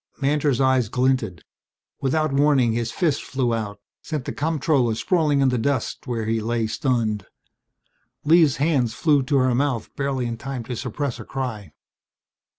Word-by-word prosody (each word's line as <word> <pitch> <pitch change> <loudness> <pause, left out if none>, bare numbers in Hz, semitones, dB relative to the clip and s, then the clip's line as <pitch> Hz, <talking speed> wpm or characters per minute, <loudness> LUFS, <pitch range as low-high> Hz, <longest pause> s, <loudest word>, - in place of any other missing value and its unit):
Mantor's 145 -2 +1
eyes 130 -4 +3
glinted. 125 - 0 0.6
Without 155 +2 +1
warning 140 -5 +3
his 115 0 -2
fist 155 -4 0
flew 130 -3 -1
out, 105 -3 -4 0.2
sent 150 -5 -4
the - - -4
comptroller 145 -6 +1
sprawling 150 - +1
in 135 - +4
the 125 -2 0
dust 130 0 -2
where 115 -3 -2
he 115 +1 0
lay 115 +1 -1
stunned. 110 -3 -1 1.0
Lee's 155 -2 +5
hands 135 -6 +1
flew 145 -2 +3
to 140 +2 +1
her 130 -1 +3
mouth 130 -3 -1
barely 140 -3 -1
in 115 -1 -3
time 135 0 -5
to 125 +2 -5
suppress 140 +1 -3
a - - -6
cry. 120 -6 -5
130 Hz, 155 wpm, -23 LUFS, 115-145 Hz, 1.0 s, Lee's